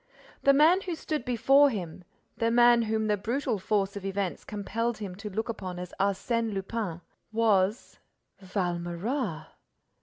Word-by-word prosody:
The 275 - +5
man 315 +7 +5
who 360 -3 -4
stood 310 -2 -3
before 270 +4 +5
him, 180 -6 -5 0.3
the 230 - +1
man 240 0 +6
whom 220 -1 0
the 210 -1 +1
brutal 235 +2 -1
force 200 0 0
of 200 - -6
events 195 -1 -3
compelled 225 +3 -3
him 200 -4 -6
to 210 +1 -6
look 220 +3 -3
upon 185 -6 -5
as 180 0 -7
Arsène 220 +3 0
Lupin, 195 -3 -3 0.3
was—Valméras! 190 - -2
215 Hz, 140 wpm, -28 LUFS, 190-240 Hz, 0.3 s, man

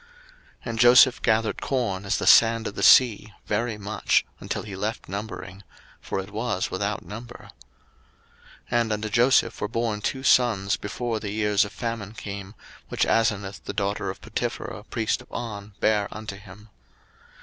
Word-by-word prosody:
01:041:049 475 - -26 0.6
And 115 - -5
Joseph 125 +1 +7
gathered 110 -1 +1
corn 110 -8 -2
as 95 - 0
the - - -3
sand 115 0 +6
of 105 - -4
the - - -5
sea, 110 -4 +5
very 110 +1 -1
much, 105 +1 0
until - - -4
he 100 -3 -8
left 105 +4 -4
numbering; 100 -1 -7 0.4
for - - -3
it 95 +2 -7
was 110 -3 -2
without 100 +2 -3
number. 115 +3 -10 1.2
01:041:050 120 - +3
And 115 -1 -2
unto 105 +1 -3
Joseph 120 0 +3
were 105 - 0
born 115 -1 -2
two 130 +5 -3
sons 110 -7 +3
before 115 +2 -4
the 105 - -5
years 105 0 +2
of 105 - -6
famine 110 0 -5
came, 100 0 -7 0.3
which - - +1
Asenath 100 -3 0
the - - -4
daughter 100 -1 -2
of 95 - -7
Potipherah - - -4
priest - - -1
of - - -19
On 105 -3 -6
bare 105 -2 +2
unto 110 -2 -7
him. 100 +2 -14
105 Hz, 165 wpm, -25 LUFS, 100-115 Hz, 1.2 s, Joseph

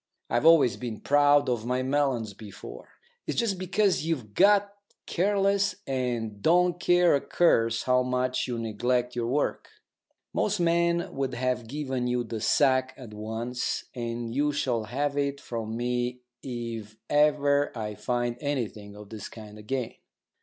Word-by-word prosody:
I've 120 +7 +3
always 155 -8 +6
been 120 -3 -5
proud 145 0 +4
of 120 -3 -1
my 125 +1 0
melons 130 -6 0
before. 105 0 -11 0.4
It's - - -2
just 210 -6 0
because 190 -1 +1
you've 135 -11 -3
got 200 - +4 0.3
careless 200 +1 +1
and 120 -6 -2
don't 175 - +3
care 175 -1 +4
a 140 - +2
curse 115 -9 +2
how 125 0 +3
much 125 0 -1
you 120 -2 -3
neglect 120 +3 -1
your 120 -1 -1
work. 145 +4 -1 0.7
Most 210 -1 0
men 170 0 +1
would 135 -2 -2
have 125 -1 -1
given 130 -2 -3
you 125 0 0
the 115 -2 -5
sack 130 +2 +2
at 120 -5 -10
once, 115 +4 -3
and 115 -1 -4
you 145 +3 +1
shall 125 -6 -1
have 140 +5 -1
it 140 0 -1
from 115 -3 -5
me 125 +1 -2 0.2
if 115 -4 -6
ever 145 -1 +3
I 105 -1 -3
find 120 +2 -2
anything 110 -8 -3
of 105 -1 -11
this 110 -3 -7
kind 105 -1 -11
again." 125 +3 -3
125 Hz, 150 wpm, -27 LUFS, 115-145 Hz, 0.7 s, always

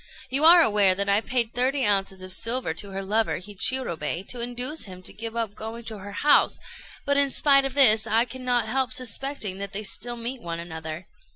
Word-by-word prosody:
You 275 +3 +3
are 340 +1 +9
aware 205 -5 +3
that 200 +1 -1
I 200 +2 +3
paid 235 -1 -2
thirty 260 +2 0
ounces 195 -2 0
of 185 0 -4
silver 230 -5 -1
to 195 +5 -4
her 195 0 -5
lover 215 +3 0
Hichirobei 190 - 0
to 245 - -5
induce 245 +6 -2
him 185 -2 -12
to - - -5
give 225 +1 -7
up 225 -3 -3
going 225 +2 -8
to 220 -2 -7
her 200 +1 -9
house; 290 +8 +3 0.5
but, 285 -1 +1
in 280 -1 +4
spite 275 0 +4
of 270 -1 -4
this, 220 -6 +6
I 225 +2 +2
cannot 250 -2 -2
help 260 +2 -1
suspecting 255 -4 -3
that 200 -1 -6
they 210 +2 -4
still 240 +4 -3
meet 240 +2 -5
one 170 -3 -5
another. 160 0 -7
225 Hz, 205 wpm, -24 LUFS, 195-255 Hz, 0.5 s, are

